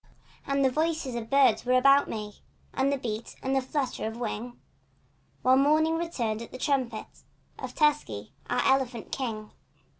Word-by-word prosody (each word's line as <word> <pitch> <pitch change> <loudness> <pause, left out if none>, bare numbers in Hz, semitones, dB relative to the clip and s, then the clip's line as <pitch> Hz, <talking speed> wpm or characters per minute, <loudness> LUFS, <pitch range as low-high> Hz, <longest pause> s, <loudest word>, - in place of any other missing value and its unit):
And 275 0 +2
the 260 - +3
voices 315 -2 -1
of 230 -1 -5
birds 275 0 +4
were 255 +1 +3
about 275 +2 +5
me— 210 -2 -6 0.3
And 270 +1 +1
the 280 - +1
beat 225 -3 -5
and 265 +1 0
the 265 - +3
flutter 265 -3 -2
of 225 +1 -6
wing; 240 +1 -4 0.8
While 255 +1 +5
morning 310 +4 +3
returned 240 -10 -2
at 235 - -9
the - - -7
trumpet 255 -5 -1 0.5
Of - - -6
Tusky, 285 - 0 0.2
our 245 - +1
elephant 260 -4 +1
king. 220 -5 -4
260 Hz, 160 wpm, -28 LUFS, 230-280 Hz, 0.8 s, about